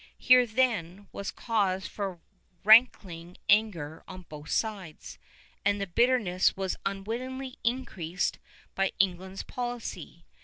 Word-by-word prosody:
Here, 250 Hz, -1 st, +6 dB
then, 210 Hz, -6 st, -1 dB
was 200 Hz, -, -5 dB
cause 195 Hz, -5 st, -1 dB
for 195 Hz, -4 st, -5 dB, 0.4 s
rankling 195 Hz, -6 st, +4 dB
anger 190 Hz, -8 st, +1 dB
on 185 Hz, -1 st, -9 dB
both 150 Hz, -1 st, -10 dB
sides, 195 Hz, -8 st, -3 dB, 0.4 s
and 205 Hz, 0 st, +2 dB
the 200 Hz, -, -1 dB
bitterness 200 Hz, -3 st, +2 dB
was 190 Hz, -1 st, -2 dB
unwittingly 250 Hz, +7 st, -5 dB
increased 195 Hz, -8 st, -2 dB, 0.3 s
by 195 Hz, 0 st, 0 dB
England's 190 Hz, 0 st, -1 dB
policy. 245 Hz, -1 st, -6 dB
200 Hz, 110 wpm, -28 LUFS, 185-235 Hz, 0.4 s, Here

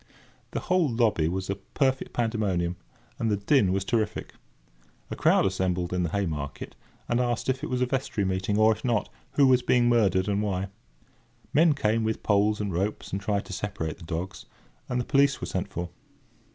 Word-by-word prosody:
The -, -, -3 dB
whole 180 Hz, -5 st, +2 dB
lobby 115 Hz, -9 st, +2 dB
was 95 Hz, +2 st, -2 dB
a 100 Hz, -, 0 dB
perfect 130 Hz, +6 st, -1 dB
pandemonium, 100 Hz, -7 st, 0 dB, 0.4 s
and 115 Hz, -, 0 dB
the 105 Hz, -, +1 dB
din 100 Hz, -1 st, +3 dB
was 95 Hz, +1 st, 0 dB
terrific. 110 Hz, -2 st, -1 dB, 0.8 s
A -, -, -2 dB
crowd -, -, +4 dB
assembled 90 Hz, -2 st, 0 dB
outside 90 Hz, -, -3 dB
in -, -, +1 dB
the 85 Hz, -, 0 dB
Haymarket, 80 Hz, -7 st, -3 dB, 0.3 s
and 120 Hz, -, +1 dB
asked 120 Hz, 0 st, 0 dB
if 130 Hz, 0 st, -1 dB
it -, -, -3 dB
was 125 Hz, 0 st, -1 dB
a -, -, +4 dB
vestry 125 Hz, -6 st, -1 dB
meeting; 95 Hz, +2 st, 0 dB
or, 110 Hz, +1 st, +6 dB
if 110 Hz, -, -3 dB
not, 120 Hz, -4 st, 0 dB, 0.2 s
who 140 Hz, -, +5 dB
was 130 Hz, -1 st, +5 dB
being 120 Hz, -1 st, +3 dB
murdered, 100 Hz, -6 st, +3 dB
and 100 Hz, 0 st, +1 dB
why? 95 Hz, -2 st, -2 dB, 0.8 s
Men 160 Hz, +1 st, +5 dB
came 115 Hz, -4 st, +1 dB
with 110 Hz, 0 st, -2 dB
poles 105 Hz, +1 st, +2 dB
and 100 Hz, -3 st, -2 dB
ropes, 100 Hz, +5 st, -2 dB
and 95 Hz, -, -2 dB
tried 100 Hz, -1 st, -1 dB
to -, -, -8 dB
separate 90 Hz, -5 st, -4 dB
the 90 Hz, -, -13 dB
dogs, 85 Hz, +3 st, -5 dB, 0.4 s
and 125 Hz, -, 0 dB
the 120 Hz, -, -2 dB
police 140 Hz, 0 st, +3 dB
were -, -, -4 dB
sent 95 Hz, 0 st, -2 dB
for. 85 Hz, -2 st, -4 dB
105 Hz, 195 wpm, -27 LUFS, 95-120 Hz, 0.8 s, or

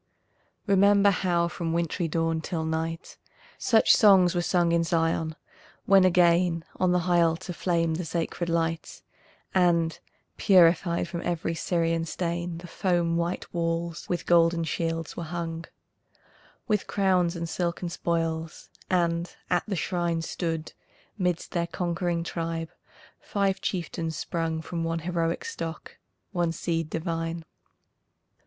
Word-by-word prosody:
Remember 200 Hz, 0 st, +5 dB
how 175 Hz, -2 st, +1 dB
from 170 Hz, -1 st, -3 dB
wintry 170 Hz, +1 st, -1 dB
dawn 165 Hz, 0 st, 0 dB
till 160 Hz, -2 st, -3 dB
night, 160 Hz, +1 st, -3 dB, 0.4 s
Such 225 Hz, -3 st, +5 dB
songs 190 Hz, -5 st, +6 dB
were 175 Hz, -, +1 dB
sung 175 Hz, 0 st, +2 dB
in 170 Hz, 0 st, +3 dB
Zion, 165 Hz, -1 st, 0 dB, 0.5 s
when 195 Hz, -1 st, +6 dB
again 175 Hz, -1 st, +3 dB
On 185 Hz, -1 st, +2 dB
the 180 Hz, 0 st, +2 dB
high 175 Hz, -1 st, +4 dB
altar 170 Hz, +2 st, 0 dB
flamed 165 Hz, -2 st, 0 dB
the 180 Hz, -, -3 dB
sacred 170 Hz, +1 st, -2 dB
light, 165 Hz, 0 st, -2 dB, 0.5 s
And, 170 Hz, -3 st, +2 dB, 0.4 s
purified 175 Hz, -3 st, +4 dB
from 170 Hz, -1 st, -5 dB
every 170 Hz, -1 st, -2 dB
Syrian 165 Hz, -1 st, 0 dB
stain, 170 Hz, 0 st, -3 dB
The 175 Hz, -, -9 dB
foam 175 Hz, -2 st, 0 dB
white 170 Hz, +1 st, -2 dB
walls 170 Hz, 0 st, -2 dB
with 175 Hz, -2 st, -2 dB
golden 170 Hz, -1 st, +4 dB
shields 165 Hz, 0 st, -2 dB
were -, -, -5 dB
hung, 165 Hz, 0 st, -4 dB, 1.0 s
With 210 Hz, -3 st, 0 dB
crowns 185 Hz, -3 st, +2 dB
and 170 Hz, 0 st, -3 dB
silken 175 Hz, +1 st, -2 dB
spoils, 165 Hz, -1 st, -3 dB, 0.2 s
and 170 Hz, -1 st, 0 dB, 0.2 s
at 175 Hz, -, +3 dB
the 205 Hz, -, -1 dB
shrine, 170 Hz, -1 st, -1 dB
Stood, 165 Hz, -2 st, -3 dB, 0.4 s
midst 180 Hz, -4 st, -1 dB
their 170 Hz, -2 st, -1 dB
conqueror 175 Hz, 0 st, -2 dB
tribe, 165 Hz, -1 st, -4 dB, 0.5 s
five 195 Hz, -1 st, -1 dB
chieftains 165 Hz, -3 st, -3 dB
sprung 165 Hz, -1 st, -2 dB
From 170 Hz, 0 st, -4 dB
one 165 Hz, 0 st, -1 dB
heroic 170 Hz, -2 st, -1 dB
stock, 165 Hz, -, -6 dB, 0.3 s
one 175 Hz, -4 st, 0 dB
seed 165 Hz, -1 st, -2 dB
divine. 165 Hz, 0 st, -3 dB
170 Hz, 130 wpm, -27 LUFS, 165-180 Hz, 1.0 s, songs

